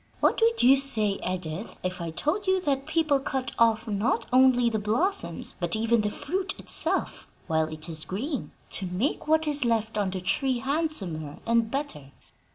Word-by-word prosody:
What -, -, +2 dB
would 460 Hz, -, +3 dB
you 265 Hz, +3 st, +7 dB
say, 220 Hz, -7 st, +1 dB
Edith, 180 Hz, +2 st, -5 dB
if 185 Hz, -1 st, -3 dB
I 170 Hz, -, -3 dB
told 310 Hz, -, -2 dB
you 375 Hz, 0 st, +3 dB
that 275 Hz, -4 st, -1 dB
people 310 Hz, -3 st, +2 dB
cut 265 Hz, -2 st, -3 dB
off 230 Hz, 0 st, +3 dB
not 210 Hz, +3 st, 0 dB
only 255 Hz, -2 st, +5 dB
the 220 Hz, -2 st, 0 dB
blossoms, 245 Hz, -, +1 dB
but -, -, 0 dB
even 225 Hz, +1 st, +2 dB
the 210 Hz, -, -1 dB
fruit 370 Hz, -, -3 dB
itself, -, -, 0 dB, 0.2 s
while 160 Hz, -1 st, 0 dB
it 155 Hz, 0 st, -6 dB
is 160 Hz, -2 st, -3 dB
green, 260 Hz, -, -4 dB, 0.2 s
to 190 Hz, -, -4 dB
make 195 Hz, +13 st, -2 dB
what 315 Hz, 0 st, +3 dB
is 295 Hz, -1 st, +3 dB
left 225 Hz, -2 st, 0 dB
on 200 Hz, -2 st, 0 dB
the 185 Hz, 0 st, -4 dB
tree 255 Hz, +8 st, 0 dB
handsomer 240 Hz, -, -2 dB
and 230 Hz, -1 st, +2 dB
better?" 160 Hz, -, -5 dB
230 Hz, 175 wpm, -26 LUFS, 190-285 Hz, 0.2 s, you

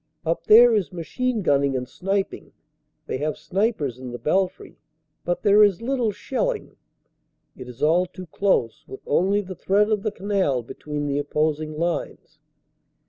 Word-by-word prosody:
Up 165 Hz, +1 st, -1 dB
there 235 Hz, +2 st, +8 dB
is 205 Hz, -5 st, 0 dB
machine 220 Hz, +7 st, -2 dB
gunning 140 Hz, -4 st, +2 dB
and 125 Hz, 0 st, -4 dB
sniping 195 Hz, +5 st, -3 dB, 0.5 s
they -, -, -3 dB
have 150 Hz, +1 st, -2 dB
snipers 185 Hz, -, -1 dB
in 130 Hz, -1 st, -7 dB
the 120 Hz, -, -6 dB
belfry 185 Hz, +7 st, -1 dB, 0.4 s
but 175 Hz, 0 st, -2 dB
there 205 Hz, +1 st, +6 dB
is 200 Hz, -4 st, +3 dB
little 245 Hz, -2 st, 0 dB
shelling. 445 Hz, -, -3 dB, 0.8 s
It 125 Hz, -1 st, -10 dB
is 125 Hz, -, -8 dB
all 170 Hz, +4 st, +3 dB
too 185 Hz, +1 st, -10 dB
close 165 Hz, -, 0 dB
with 130 Hz, -, -9 dB
only 195 Hz, +7 st, +2 dB
the 190 Hz, -1 st, -8 dB
thread 200 Hz, +4 st, +1 dB
of 210 Hz, -2 st, +1 dB
the 215 Hz, -, -1 dB
canal 190 Hz, -, -1 dB
between 145 Hz, +5 st, -5 dB
the 140 Hz, 0 st, -1 dB
oppos 150 Hz, +1 st, 0 dB
ing 155 Hz, -1 st, -6 dB
lines. 170 Hz, +1 st, -4 dB
180 Hz, 160 wpm, -23 LUFS, 145-205 Hz, 0.8 s, there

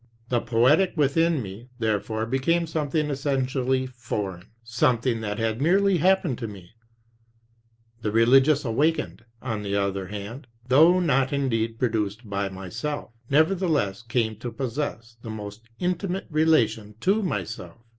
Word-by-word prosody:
The 120 Hz, -2 st, +1 dB
poetic 130 Hz, -, +3 dB
within 155 Hz, 0 st, +2 dB
me 105 Hz, +6 st, -9 dB
therefore 110 Hz, -1 st, -1 dB
became 135 Hz, +8 st, +1 dB
something 150 Hz, -1 st, -1 dB
essentially 130 Hz, -2 st, 0 dB
foreign, 105 Hz, -8 st, -5 dB, 0.2 s
something 120 Hz, -1 st, +1 dB
that 105 Hz, -1 st, -3 dB
had 115 Hz, +1 st, -1 dB
merely 190 Hz, +4 st, +3 dB
happened 180 Hz, -7 st, +2 dB
to 115 Hz, -, -3 dB
me; 95 Hz, -4 st, -11 dB, 1.3 s
the 105 Hz, -, -1 dB
religious 135 Hz, +6 st, +4 dB
awakening, 150 Hz, +8 st, 0 dB, 0.2 s
on 110 Hz, -5 st, -3 dB
the 100 Hz, -1 st, -2 dB
other 100 Hz, -1 st, -1 dB
hand, 105 Hz, +6 st, -7 dB, 0.2 s
though 160 Hz, +8 st, +6 dB
not 135 Hz, -6 st, +2 dB
indeed 115 Hz, -5 st, 0 dB
produced 110 Hz, -2 st, -1 dB
by 100 Hz, -1 st, -2 dB
myself, 110 Hz, +11 st, -5 dB, 0.2 s
nevertheless 155 Hz, -, +2 dB
came 115 Hz, -2 st, -1 dB
to 120 Hz, +2 st, -6 dB
possess 120 Hz, -2 st, -4 dB
the 115 Hz, -, -8 dB
most 110 Hz, +1 st, -8 dB
intimate 180 Hz, +1 st, -2 dB
relation 115 Hz, -9 st, +2 dB
to 200 Hz, +4 st, +2 dB
myself. 120 Hz, -, -4 dB
125 Hz, 130 wpm, -25 LUFS, 110-150 Hz, 1.3 s, though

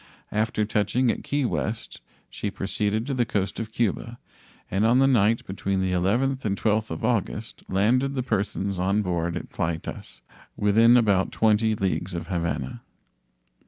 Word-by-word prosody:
After 110 Hz, 0 st, 0 dB
touching 110 Hz, +4 st, +1 dB
at -, -, -6 dB
Key 145 Hz, -1 st, 0 dB
West, 75 Hz, -, -3 dB, 0.3 s
she 105 Hz, -, -4 dB
proceeded 105 Hz, +3 st, -1 dB
to 140 Hz, -, -2 dB
the 125 Hz, -2 st, +2 dB
coast 100 Hz, -3 st, -2 dB
of 110 Hz, -1 st, -5 dB
Cuba, 115 Hz, +1 st, -1 dB, 0.5 s
and 95 Hz, +3 st, +1 dB
on 115 Hz, +3 st, +4 dB
the 135 Hz, -, +5 dB
night 115 Hz, -4 st, +3 dB
between 95 Hz, 0 st, -2 dB
the 95 Hz, -1 st, 0 dB
11th 120 Hz, +10 st, +1 dB
and 100 Hz, -2 st, -1 dB
12th 110 Hz, 0 st, +1 dB
of -, -, -3 dB
August 110 Hz, -1 st, -2 dB
landed 125 Hz, +8 st, +2 dB
the 130 Hz, -, -1 dB
persons 100 Hz, -4 st, -1 dB
on 100 Hz, +3 st, +1 dB
board 85 Hz, -2 st, -1 dB
at -, -, -8 dB
Playtas, 85 Hz, -3 st, -4 dB, 0.4 s
within 115 Hz, +4 st, +5 dB
about 100 Hz, -5 st, +2 dB
20 110 Hz, 0 st, +2 dB
leagues 95 Hz, -2 st, -2 dB
of 85 Hz, -, -4 dB
Havana. 85 Hz, -8 st, -2 dB
105 Hz, 160 wpm, -25 LUFS, 95-115 Hz, 0.5 s, the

